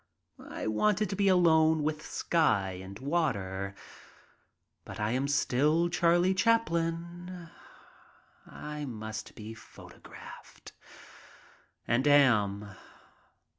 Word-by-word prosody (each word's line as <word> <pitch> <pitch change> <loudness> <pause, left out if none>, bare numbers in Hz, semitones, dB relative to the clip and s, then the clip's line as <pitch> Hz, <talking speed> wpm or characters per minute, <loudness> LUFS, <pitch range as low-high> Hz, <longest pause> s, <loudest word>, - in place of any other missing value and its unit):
I - - -6
wanted 205 - +1
to - - -2
be 200 0 +1
alone 160 -4 +4
with 155 0 -2
sky 115 - +1
and 95 +1 -9
water. 100 - -2 1.1
But 95 +3 -9
I 105 +1 0
am 130 +3 0
still 150 +4 +2
Charlie 175 +2 +3
Chaplin. 175 -4 -1 1.0
I 150 0 -7
must 110 -3 -7
be 110 +1 -8
photographed 110 -1 -13 0.6
— - - -27
and 125 +5 +1
am. 105 -8 +3
150 Hz, 95 wpm, -29 LUFS, 110-170 Hz, 1.1 s, alone